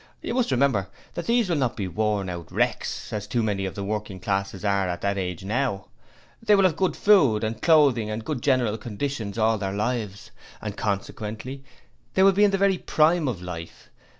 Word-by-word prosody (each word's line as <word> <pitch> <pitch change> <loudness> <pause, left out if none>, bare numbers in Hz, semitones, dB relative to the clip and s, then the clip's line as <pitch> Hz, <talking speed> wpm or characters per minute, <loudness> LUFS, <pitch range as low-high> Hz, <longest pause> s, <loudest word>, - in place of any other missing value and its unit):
You - - -3
must 250 -1 +1
remember 125 -8 +2 0.2
that 170 - -5
these 235 -2 +3
will 170 -3 0
not 130 -4 0
be 100 -4 -2
worn 105 +1 -1
out 85 -2 -6
wrecks, - - -1
as 105 -1 -3
too 120 +1 0
many 100 -3 -1
of 95 - -7
the 100 - -4
working 105 -1 -4
classes 100 +1 -2
are 100 -2 +1
at 90 -1 -4
that 100 0 0
age 90 -1 -4
now. 110 -3 -1 0.5
They 210 -2 +4
will 195 - +4
have 185 - +5
had - - -12
good 190 -1 +1
food 140 - +4
and 110 0 -3
clothing 140 -9 +4
and 110 +1 -4
good 150 -6 -3
general 125 -5 +1
conditions 115 -2 -4
all 110 -1 +2
their 95 -1 -2
lives; 105 -2 -3 0.3
and 105 -1 -5
consequently 110 +6 -4 0.5
they 190 - +5
will 195 - +7
be 200 +2 +3
in 205 - +6
the 195 - +1
very 195 -2 +2
prime 160 0 +2
of 100 -8 -3
life. 85 -2 -8
110 Hz, 205 wpm, -25 LUFS, 100-145 Hz, 0.5 s, will